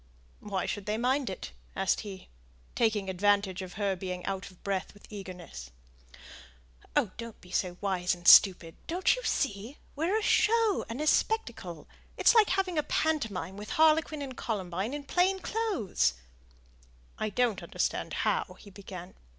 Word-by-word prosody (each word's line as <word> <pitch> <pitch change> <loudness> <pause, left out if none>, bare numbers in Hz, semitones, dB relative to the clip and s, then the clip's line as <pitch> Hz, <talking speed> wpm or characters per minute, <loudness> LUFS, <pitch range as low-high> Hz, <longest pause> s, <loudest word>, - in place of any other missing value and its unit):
"Why 195 -3 -3
should 205 -1 -4
they 210 +1 0
mind 255 +1 +1
it?" 190 - -6 0.2
asked 195 -1 +1
he, 195 -3 -8 0.5
taking 215 -4 +1
advantage 195 0 +1
of 185 -1 -8
her 200 -2 0
being 180 -1 -5
out 195 -1 -3
of 185 - -21
breath 195 0 -2
with 205 - -16
eagerness. 180 - -8 1.3
"Oh, 205 - +2
don't 230 -2 -8
be 180 - -16
so 180 -1 -1
wise 185 -2 0
and 175 0 -8
stupid; 175 -4 +7
don't 360 +7 +2
you - - -6
see, 225 +1 -1 0.2
we're 335 +8 +1
a 440 - -2
show 450 -2 +3
and 235 +6 -4
a - - -1
spectacle 235 - 0 0.3
it's - - +5
like 445 -3 +5
having 375 -4 +1
a 300 - -4
pantomime 210 - -1
with 210 +1 -8
harlequin 310 -1 +3
and 260 -2 -7
columbine 200 +2 -3
in 290 - -5
plain 360 +6 +2
clothes." 380 - 0 1.0
"I 215 - -1
don't 235 0 +1
understand - - -2
how - - 0
" - - -22
he 200 - -13
began. 185 -2 -9
205 Hz, 160 wpm, -29 LUFS, 185-295 Hz, 1.3 s, stupid